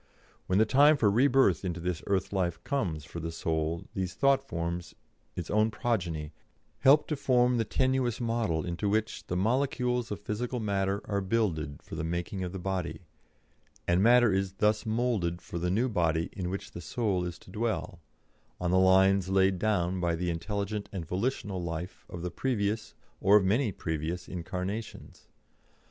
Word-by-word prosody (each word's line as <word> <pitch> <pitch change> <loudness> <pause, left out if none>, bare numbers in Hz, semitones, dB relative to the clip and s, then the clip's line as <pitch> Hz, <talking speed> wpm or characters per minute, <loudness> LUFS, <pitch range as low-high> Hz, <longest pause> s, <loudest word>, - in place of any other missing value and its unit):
When 95 - +2
the 110 - +5
time 145 +6 +5
for 105 -6 +3
rebirth 125 - +4
into 90 -2 -3
this 90 0 -2
earth 100 0 0
life 90 -3 0
comes 90 - -2
for 85 - -7
the 80 0 -4
soul 80 0 -2
these 95 -4 -3
thought 140 -1 +4
forms, 85 -8 -4 0.4
its 85 - -5
own 110 +1 +3
progeny, 90 -9 -2 0.5
help 145 +3 +5
to 155 - 0
form 125 -3 +3
the 115 - +1
tenuous 130 -1 +1
model 115 -9 0
into 90 +4 -2
which 110 +2 -1
the 90 - -1
molecules 125 +2 0
of 105 - -4
physical 120 +4 -3
matter 100 -2 0
are 100 -1 -1
builded 95 -9 -1
for - - -13
the - - -3
making 85 +3 -3
of 90 - -4
the 95 - -5
body, 95 -1 -3 0.9
and 85 +2 +3
matter 120 -1 +6
is 95 0 0
thus 105 +3 +1
moulded 110 -7 0
for 85 - -6
the 90 +1 -1
new 110 +8 +2
body 85 -7 0
in 90 -2 -3
which 100 +2 -5
the 85 - -8
soul 100 -6 -1
is 90 -1 -4
to - - -16
dwell, 110 -5 -2 0.6
on 90 -1 -1
the 95 - +4
lines 95 0 +4
laid 95 -1 +3
down 95 -3 +1
by 85 -1 +1
the 90 +1 -1
intelligent 100 +4 -3
and 95 -5 -5
volitional 95 - -2
life 85 +1 -6
of 85 -1 -7
the 90 - -3
previous, 110 -4 -1 0.2
or 100 +2 +6
of 100 - +2
many 110 +4 +2
previous, 80 +1 -3
incarnations. 95 +4 -6
95 Hz, 175 wpm, -29 LUFS, 85-115 Hz, 0.9 s, matter